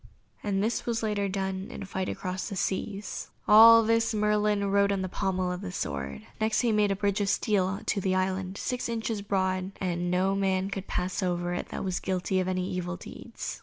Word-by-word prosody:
And 200 -1 0
this 230 +3 -1
was 230 -1 -1
later 205 -2 0
done, 190 0 -3
in - - -7
a - - -6
fight 190 -1 -3
across 185 +2 -4
the 200 - -5
seas. 195 +2 -3 0.2
All 230 +2 +9
this 230 0 +2
Merlin 210 -1 +2
wrote 200 0 +3
on 195 -1 0
the - - -1
pommel 185 -1 -1
of 180 +1 -4
the 195 -3 -5
sword. 70 - -4
Next 220 0 +2
he 240 -2 +2
made 210 -2 +3
a - - +1
bridge 200 +1 0
of 200 - +1
steel 195 -1 +1
to 205 - 0
the 185 0 +1
island, 190 0 -1
six 250 -2 -2
inches 225 -2 -2
broad, 190 -1 -1
and 175 -1 -1
no 185 +2 +2
man 190 0 0
could 195 0 -5
pass 180 +3 -2
over 175 -1 -1
it 175 - -4
that - - -4
was 185 -2 -1
guilty 185 0 -1
of 185 - -1
any 185 -1 -1
evil 180 -1 -3
deeds. - - -7
195 Hz, 210 wpm, -28 LUFS, 185-210 Hz, 0.2 s, All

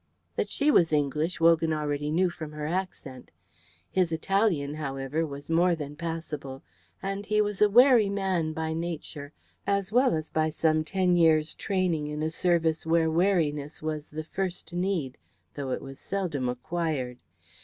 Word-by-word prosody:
That - - -1
she 295 +1 +2
was 170 - +4
English, 150 +3 0
Wogan 165 -1 +4
already 150 -1 -2
knew 175 +3 +2
from 155 -3 -8
her 150 0 -5
accent. 165 -7 -4 0.6
His 185 -3 +1
Italian, 165 -4 +1
however, 140 +1 -2
was 140 0 -8
more 170 +2 +3
than 150 -2 -6
passable, 155 -5 -5 0.4
and 195 +1 -3
he 215 0 +2
was 210 -1 0
a 210 - +6
wary 240 -1 +6
man 190 -5 0
by 160 0 -3
nature 160 -3 -5 0.4
as 200 0 0
well 250 -4 +4
as 155 0 -4
by 155 0 +1
some 155 0 +1
ten 180 +2 +1
years' 160 -2 +4
training 180 -6 -1
in 150 +1 -3
a 160 - -1
service 165 -2 +1
where 160 0 +2
wariness 160 -5 +1
was 155 -1 -3
the 155 +1 -5
first 180 0 -3
need, 175 -7 -1 0.3
though 140 -2 -5
it 130 - -3
was 135 0 -9
seldom 165 -10 -2
acquired. 130 -2 -3
160 Hz, 160 wpm, -27 LUFS, 150-185 Hz, 0.6 s, a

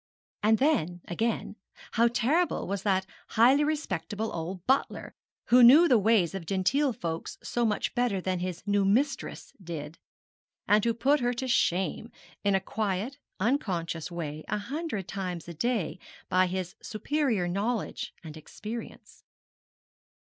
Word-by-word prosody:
And 220 +1 +4
then, 215 - +1
again, 220 +3 -2 0.3
how 235 +1 +4
terrible 280 +9 +1
was 195 0 -2
that 190 -2 +1 0.2
highly 255 +6 +5
respectable 220 - -2
old 170 +2 -5
butler, 265 +2 0 0.4
who 250 +1 +7
knew 285 +9 +9
the 245 -6 +5
ways 205 -5 +3
of 185 -4 -6
gentle 260 +9 +2
folks 165 -7 -5
so 240 -1 0
much 210 -2 -1
better 240 -5 +1
than 185 0 -2
his 180 -1 -4
new 205 -1 +2
mistress 250 +9 0
did; 160 -2 -7 0.7
and 210 0 +4
who 230 -1 +1
put 280 +5 +3
her 245 -1 0
to 260 +2 -3
shame, 190 -1 +1 0.3
in 200 -1 +3
a - - +3
quiet 210 +6 -3 0.2
unconscious 185 - -1
way, 155 -3 -5
a 210 - -1
hundred 235 - -4
times 180 -4 -4
a 170 - -6
day 190 -1 -1 0.3
by 185 0 +4
his 185 0 -3
superior 230 -4 -1
knowledge 205 +5 -2
and 155 -2 -9
experience. 215 +8 -9
205 Hz, 140 wpm, -28 LUFS, 180-245 Hz, 0.7 s, knew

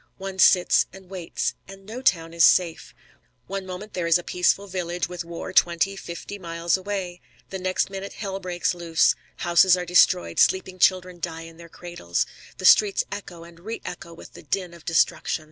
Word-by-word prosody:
One 190 -1 -7
sits 180 -1 +5
and 190 0 -15
waits. 180 -3 -3
And 195 0 -13
no 230 +5 -7
town 165 -9 +1
is 170 -1 +3
safe. 170 -3 +3 0.5
One 195 -1 -5
moment 185 +3 -8
there 175 -2 -2
is 170 - +5
a 175 - -8
peaceful 180 +3 +1
village 180 -2 -3
with 180 -1 -6
war 170 +2 -7
twenty, 175 +2 +2
fifty 195 +2 -8
miles 170 -1 -1
away. 190 -2 -4 0.3
The 190 - -4
next 185 +1 -1
minute 195 0 -6
hell 195 -2 -5
breaks 180 -2 -1
loose. 170 -2 +2 0.2
Houses 175 +1 +4
are 180 - -4
destroyed. 125 - +3
Sleeping 185 0 +2
children 180 -1 +2
die 165 -1 -5
in 165 0 -13
their 170 0 -13
cradles. 170 - -3 0.3
The - - -6
streets 205 -2 +5
echo 180 -4 -8
and 170 0 -15
reëcho 175 -4 -8
with - - -13
the - - -12
din 180 +2 -3
of 170 -2 -15
destruction. 165 -1 +1
180 Hz, 180 wpm, -24 LUFS, 170-190 Hz, 0.5 s, sits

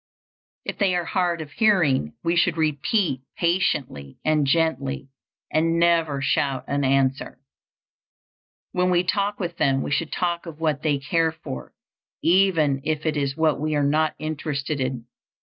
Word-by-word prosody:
If - - -5
they 195 -3 +2
are 175 -1 -1
hard 175 -3 0
of 150 -2 -8
hearing, 150 - +2
we 170 +1 +1
should 170 -1 +2
repeat 155 - 0 0.2
patiently 145 - -1
and 155 -2 +2
gently 140 -3 0 0.4
and 165 +1 +2
never 165 -5 +2
shout 135 -1 0
an 140 0 0
answer. 135 -1 +1 1.3
When 180 0 +1
we 180 0 +3
talk 200 +2 -1
with 175 -3 -4
them 135 0 +2
we - - -4
should 155 +2 0
talk 170 -1 -2
of 160 -2 -9
what 155 -3 0
they 150 -2 +1
care 160 +4 +1
for, 65 - -8 0.5
even 165 -6 +3
if 155 0 -2
it 155 -1 0
is 140 -1 -1
what 160 -3 +2
we 155 +1 -1
are 145 - +2
not 155 +2 +1
interested 150 -2 -3
in. 130 -2 -3
155 Hz, 155 wpm, -24 LUFS, 140-170 Hz, 1.3 s, we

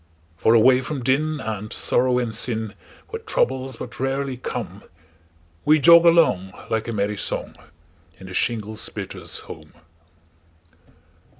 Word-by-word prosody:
For 110 +8 +3
away 125 +3 +5
from 135 0 -5
din, 150 +4 +1
and 110 -3 -5
sorrow 125 0 +1
and 120 -3 -1
sin, 110 -2 -1 0.4
Where - - -6
troubles 130 0 -1
but - - -9
rarely 135 0 -2
come, 125 - -6 0.8
We 155 +1 +5
jog 170 +4 +7
along, 105 - +3 0.2
like 110 0 -1
a - - -2
merry 105 -1 -1
song, - - -3 0.6
In 95 - -11
the 95 - -9
shingle 110 0 -2
splitter's - - -3
home. - - -12
125 Hz, 130 wpm, -22 LUFS, 110-135 Hz, 0.8 s, jog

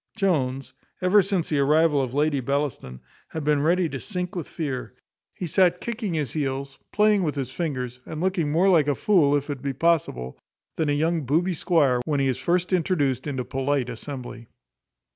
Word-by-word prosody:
Jones, 135 -10 0 0.3
ever 185 +3 +5
since 190 -3 -1
the 150 - +1
arrival 150 +1 +3
of 130 -2 -2
Lady 145 +1 +1
Bellaston, 130 - -3 0.3
had 160 - -5
been 150 -1 +2
ready 170 +3 +2
to 135 - -5
sink 180 0 -4
with 170 -5 -4
fear. 140 -6 -4 0.4
He 180 - -4
sat 180 +1 +3
kicking 220 -6 -3
his 145 -7 -1
heels, 135 -2 -3
playing 210 -1 +3
with 150 -5 -1
his 135 -3 -3
fingers, 130 -6 -3
and 155 +3 -7
looking 175 -4 0
more 170 +5 +3
like 165 -6 +4
a 145 - +2
fool, 155 -8 +3
if 145 +1 -1
it 135 -3 -5
be 140 -1 -2
possible, 135 - 0 0.4
than 160 -2 0
a - - +2
young 160 +3 +1
booby 170 +7 +2
squire, 145 -7 +2
when 145 -2 0
he 135 - +2
is 130 -1 -1
first 175 +6 0
introduced 150 -7 +1
into 130 -3 -2
a - - -16
polite 135 -1 -1
assembly. 125 -1 -7
150 Hz, 190 wpm, -25 LUFS, 135-175 Hz, 0.4 s, ever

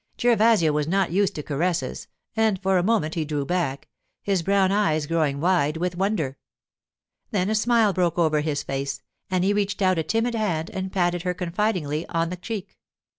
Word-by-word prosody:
Gervasio 225 -8 +4
was 150 0 0
not 190 0 +1
used 195 +2 +1
to 150 - -4
caresses, 165 +5 -2 0.3
and 220 -4 +2
for 190 -1 +2
a - - 0
moment 195 -7 +1
he 165 - -1
drew 145 -2 -2
back, 150 -5 -2 0.4
his 195 -3 +1
brown 195 +1 +2
eyes 160 -7 +1
growing 150 -3 0
wide 165 -2 +2
with 180 +1 -2
wonder. 175 -8 -1 0.9
Then 205 -2 0
a - - +2
smile 220 -1 +3
broke 175 -2 0
over 155 -3 +2
his 150 -2 -2
face, 135 +1 -4 0.3
and 185 -1 +1
he 200 +2 +2
reached 205 -1 -1
out 185 -3 +2
a - - 0
timid 225 +8 0
hand 180 -8 -1
and 190 0 -4
patted 175 -2 0
her 180 0 -2
confidingly 175 -4 -1
on 165 0 -1
the - - -3
cheek. 195 +1 -7
180 Hz, 185 wpm, -24 LUFS, 155-200 Hz, 0.9 s, Gervasio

